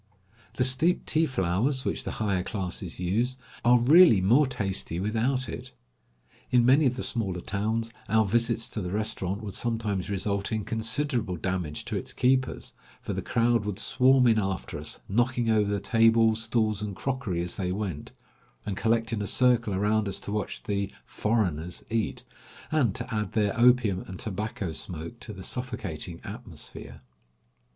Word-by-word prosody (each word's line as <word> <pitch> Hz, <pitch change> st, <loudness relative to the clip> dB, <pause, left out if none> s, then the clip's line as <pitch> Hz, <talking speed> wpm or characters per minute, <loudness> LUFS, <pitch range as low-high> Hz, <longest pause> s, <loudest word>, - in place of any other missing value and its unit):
The 125 Hz, -, +2 dB
steeped 130 Hz, +8 st, +2 dB
tea 160 Hz, +1 st, +2 dB
flowers, 125 Hz, +5 st, 0 dB
which -, -, -2 dB
the -, -, -3 dB
higher 100 Hz, -4 st, 0 dB
classes 90 Hz, -2 st, -3 dB
use, 115 Hz, +8 st, 0 dB, 0.3 s
are 120 Hz, +1 st, +6 dB
really 145 Hz, -, +7 dB
more 120 Hz, +10 st, +4 dB
tasty 95 Hz, -8 st, -1 dB
without 115 Hz, +6 st, 0 dB
it. 125 Hz, +2 st, -7 dB, 0.8 s
In 120 Hz, -1 st, +4 dB
many 135 Hz, +4 st, +5 dB
of 125 Hz, -, 0 dB
the 125 Hz, -, -3 dB
smaller 95 Hz, -6 st, -1 dB
towns, 110 Hz, +5 st, -2 dB, 0.2 s
our 110 Hz, +1 st, +4 dB
visits 115 Hz, +2 st, +1 dB
to 105 Hz, -, -4 dB
the 90 Hz, -, -4 dB
restaurant 100 Hz, 0 st, -1 dB
would 100 Hz, -3 st, -5 dB
sometimes 110 Hz, -5 st, -1 dB
result 100 Hz, 0 st, -1 dB
in 110 Hz, -1 st, -1 dB
considerable 115 Hz, -2 st, -1 dB
damage 90 Hz, -4 st, -3 dB
to -, -, -4 dB
its -, -, -3 dB
keepers, 130 Hz, 0 st, +1 dB, 0.3 s
for -, -, -5 dB
the -, -, -3 dB
crowd 115 Hz, -1 st, +2 dB
would 105 Hz, -2 st, -3 dB
swarm 130 Hz, +3 st, +4 dB
in 115 Hz, -2 st, +4 dB
after 95 Hz, -2 st, -3 dB
us, -, -, -4 dB
knocking 120 Hz, +2 st, +1 dB
over 105 Hz, -2 st, +2 dB
the 100 Hz, 0 st, 0 dB
table, 115 Hz, 0 st, +4 dB
stools, 110 Hz, -2 st, +1 dB
and 105 Hz, -2 st, -4 dB
crockery 120 Hz, -7 st, -2 dB
as 85 Hz, -, -2 dB
they 90 Hz, -2 st, -1 dB
went, 95 Hz, -6 st, -4 dB, 0.5 s
and 100 Hz, -, -3 dB
collect 115 Hz, +2 st, +1 dB
in 105 Hz, -, -1 dB
a 100 Hz, -, -2 dB
circle 120 Hz, -5 st, +3 dB
around 105 Hz, +2 st, +1 dB
us 95 Hz, -, -1 dB
to -, -, -6 dB
watch 105 Hz, -1 st, -3 dB
the 100 Hz, -1 st, -2 dB
"foreigners" 90 Hz, -7 st, -1 dB
eat, 115 Hz, -1 st, -1 dB, 0.5 s
and 130 Hz, -10 st, +2 dB
to 125 Hz, -, -4 dB
add 105 Hz, -1 st, -2 dB
their 105 Hz, -3 st, +1 dB
opium 120 Hz, -5 st, +4 dB
and 95 Hz, -, -7 dB
tobacco 105 Hz, -3 st, -4 dB
smoke 85 Hz, +7 st, -5 dB
to 110 Hz, -, -7 dB
the 95 Hz, -2 st, -9 dB
suffocating 90 Hz, -10 st, -4 dB
atmosphere. -, -, -7 dB
110 Hz, 165 wpm, -27 LUFS, 95-120 Hz, 0.8 s, really